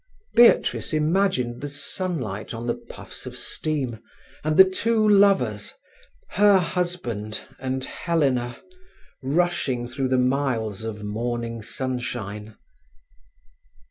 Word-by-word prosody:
Beatrice 235 -5 +4
imagined 155 -6 +1
the 145 - -4
sunlight 145 - -4
on 115 +1 -6
the 120 - +1
puffs - - -11
of - - -7
steam, 135 -8 -3 0.4
and 155 0 0
the 190 - +10
two 220 +3 +1
lovers, 195 - +3 0.5
her 205 0 +5
husband 165 - -2 0.2
and 130 0 -2
Helena, 135 -8 0 0.6
rushing 140 -4 0
through 130 +2 -2
the 130 0 +2
miles 125 -5 0
of 105 -2 -5
morning 115 +2 -3
sunshine. 110 -4 -4
130 Hz, 105 wpm, -24 LUFS, 115-175 Hz, 0.6 s, the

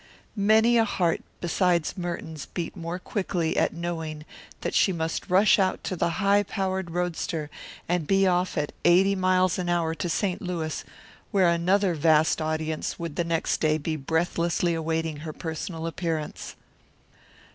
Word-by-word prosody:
Many 220 +3 +4
a - - +5
heart 180 -6 0 0.2
besides 175 -1 +1
Merton's 170 -4 -5
beat 170 -2 -5
more 170 -1 -4
quickly 180 -4 -2
at - - +2
knowing 160 -3 -4 0.4
that - - -2
she 195 - +4
must 165 -2 -3
rush 195 +4 +5
out 190 -1 +1
to 185 - -3
the 170 - +1
high 200 0 +4
powered 190 -2 -2
roadster 165 -3 -2 0.4
and 175 -3 0
be 195 0 +4
off 180 -1 +1
at 150 -1 -1
eighty 190 +3 +5
miles 185 -1 +2
an 175 -1 -2
hour 170 -2 +1
to 175 +1 -3
St. 185 +2 -1
Louis, 170 -4 -3 0.5
where 190 -5 +4
another 180 +3 +2
vast 160 0 +3
audience 155 0 -2
would 165 -3 -5
the 170 - +1
next 165 -1 0
day 155 -1 +3
be 155 +1 -3
breathlessly 170 +3 0
awaiting 160 -1 -2
her 155 +1 -6
personal 160 +1 -5
appearance. 165 -2 -4
170 Hz, 155 wpm, -26 LUFS, 160-185 Hz, 0.5 s, a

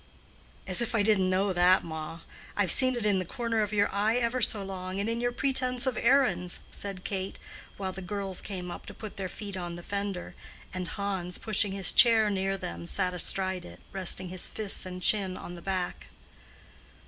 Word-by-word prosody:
"As 185 +4 +5
if 235 0 -1
I 210 - +3
didn't 200 -3 +3
know 190 +1 +1
that, 180 +1 +4
ma. 160 0 -7 0.4
I - - +3
have 185 -5 +4
seen 255 -1 +7
it 235 -3 -3
in 200 -2 +3
the - - -1
corner 230 +4 -2
of 210 0 -1
your 205 -1 +3
eye 210 +3 +1
ever 245 +1 0
so 210 -3 +2
long, 190 0 -5
and 200 - -1
in 230 +1 -1
your 245 0 0
pretense 255 0 +1
of 260 -3 0
errands," 190 -11 +2
said 195 -2 -6
Kate, 190 -1 -4 0.4
while 190 -1 -3
the 190 - -8
girls 195 0 -4
came 180 -3 -6
up - - -9
to - - -9
put 215 -2 -9
their 190 -2 -4
feet 200 +1 -7
on 175 -2 -5
the 175 - -9
fender, 200 -2 -4 0.4
and 185 -1 -4
Hans, 190 -3 -3
pushing 205 -2 -1
his 195 -3 +6
chair 220 -3 +5
near 195 0 -1
them, 85 - -7
sat 180 - +1
astride 185 +1 +2
it, 85 +1 -12
resting 185 -1 +1
his 185 0 -2
fists 205 -3 +1
and 180 0 -7
chin 195 -3 +2
on 175 - -8
the 175 - -9
back. 185 -1 -3
195 Hz, 205 wpm, -28 LUFS, 185-215 Hz, 0.4 s, seen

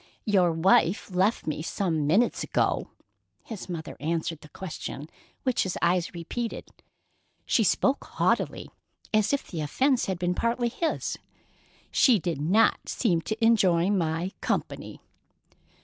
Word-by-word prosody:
"Your 185 -5 +3
wife 180 +3 +2
left 190 +5 +1
me 155 0 -2
some 160 -3 -1
minutes 205 +10 +2
ago," - - 0 0.5
his 215 -4 -8
mother 165 -3 -5
answered 165 0 -2
the 150 - -14
question 155 -4 -7 0.4
which 255 -2 +1
his 190 - -2
eyes 175 0 +1
repeated. 225 +8 -5 0.8
She 225 - +3
spoke 265 +7 +2
haughtily, - - -1 0.4
as 215 -1 +3
if 280 - 0
the 165 -4 -5
offence 255 - +1
had 190 -2 -1
been 175 0 0
partly 235 +4 0
his. 320 +7 -2 0.7
"She 250 -5 +5
did 170 -5 -3
not 195 +9 +2
seem 175 -9 +1
to 220 +5 -1
enjoy 190 -5 +4
my 170 -1 0
company." - - -3
185 Hz, 135 wpm, -27 LUFS, 165-225 Hz, 0.8 s, She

